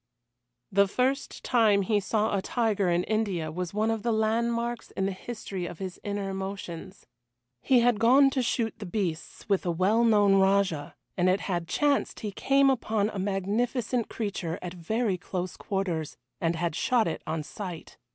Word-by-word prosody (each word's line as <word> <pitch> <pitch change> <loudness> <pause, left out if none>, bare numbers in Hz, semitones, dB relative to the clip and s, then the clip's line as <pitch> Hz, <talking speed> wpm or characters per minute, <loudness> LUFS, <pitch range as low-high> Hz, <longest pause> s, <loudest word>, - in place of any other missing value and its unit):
The 200 0 +4
first 260 +7 -1
time 215 -5 +3
he 205 +2 +2
saw 210 +1 0
a 195 - 0
tiger 210 -3 0
in 175 +1 +2
India 195 -8 -1
was 175 +1 -4
one 215 +2 +1
of 225 -1 -2
the 235 - 0
landmarks 235 +2 0
in 190 - -2
the 195 - 0
history 190 -2 -6
of 175 - -8
his 185 0 -6
inner 200 -1 -3
emotions. 190 -1 -6 0.6
He 255 -3 +4
had 240 -3 +3
gone 265 +4 +6
to 265 - 0
shoot 230 -2 0
the 205 - -6
beasts 175 -5 -4
with 200 -3 +1
a 175 - -1
well 190 +7 +2
known 205 -3 +5
Rajah, 190 -6 +2 0.2
and 180 0 +2
it 190 +2 +2
had 175 -3 -2
chanced 290 - +1
he 210 - -3
came 275 +6 +3
upon 220 -4 0
a 200 - -5
magnificent 215 +5 -1
creature 190 -6 -3
at 180 -1 -5
very 195 +3 -1
close 180 -1 -4
quarters 180 -6 -3 0.2
and 165 0 0
had 165 -1 -2
shot 240 +1 +2
it 160 - -3
on 160 -1 -2
sight. 180 0 -8
200 Hz, 175 wpm, -28 LUFS, 180-230 Hz, 0.6 s, gone